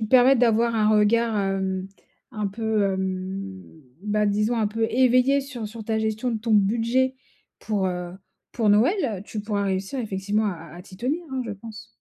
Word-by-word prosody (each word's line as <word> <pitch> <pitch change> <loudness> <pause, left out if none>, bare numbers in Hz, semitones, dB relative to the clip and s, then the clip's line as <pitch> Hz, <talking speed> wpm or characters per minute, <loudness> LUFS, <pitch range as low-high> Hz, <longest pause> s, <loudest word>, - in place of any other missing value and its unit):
te 220 - -1
permettent 255 +2 +6
d'avoir 230 -1 +3
un 215 -1 +3
regard, 215 +1 +3
hem, 190 -1 -1 0.4
un 210 -2 -3
peu 220 0 0
hem, 190 0 -3 0.4
bah 210 0 +1
disons 210 +3 +1
un 220 -2 +1
peu 225 +2 -1
éveillé. 255 +2 +4
Sur 245 -6 -6
sur 220 0 -9
ta 220 -1 0
gestion 220 +3 -1
de 225 - -2
ton 225 0 -2
budget, 235 +6 +2 0.4
pour, 205 -3 -1
heu, 180 -1 -4 0.4
pour 220 -3 +2
Noël. 230 - +2
Tu 215 - -5
pourras 205 -2 -1
réussir 195 +6 -2
effectivement 210 -1 -1
à 200 - 0
à 165 0 -12
à 175 - -9
t'y 185 -1 -14
tenir 280 - -2
hein, 260 -1 -2
je 230 - -5
pense. 215 +2 -10
215 Hz, 185 wpm, -24 LUFS, 195-235 Hz, 0.4 s, permettent